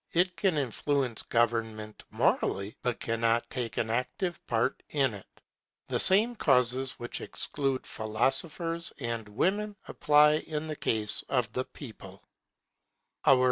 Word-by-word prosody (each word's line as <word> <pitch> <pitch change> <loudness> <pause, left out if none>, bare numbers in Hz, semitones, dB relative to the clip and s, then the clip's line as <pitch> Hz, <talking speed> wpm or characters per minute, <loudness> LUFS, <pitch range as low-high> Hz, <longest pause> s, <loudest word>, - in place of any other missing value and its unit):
It 180 +1 +2
can 190 -6 +1
influence 135 -2 0
government 115 -2 -1
morally, 100 +2 0
but 125 -2 -1
cannot 115 0 +1
take 120 -5 -3
an 110 - 0
active 160 +9 -2
part 115 +3 0
in 135 -5 +1
it. 100 - -10 0.6
The - - 0
same 220 +6 +5
causes 130 - +2
which 120 - -5
exclude 135 -3 -2
philosophers 145 +10 -1
and 115 -4 -4
women 205 - 0
apply 150 0 +5
in 155 0 -4
the 155 -1 -4
case 110 -6 0
of 120 -5 0
the 130 - -1
people. 100 -8 -11
125 Hz, 125 wpm, -29 LUFS, 115-150 Hz, 0.6 s, same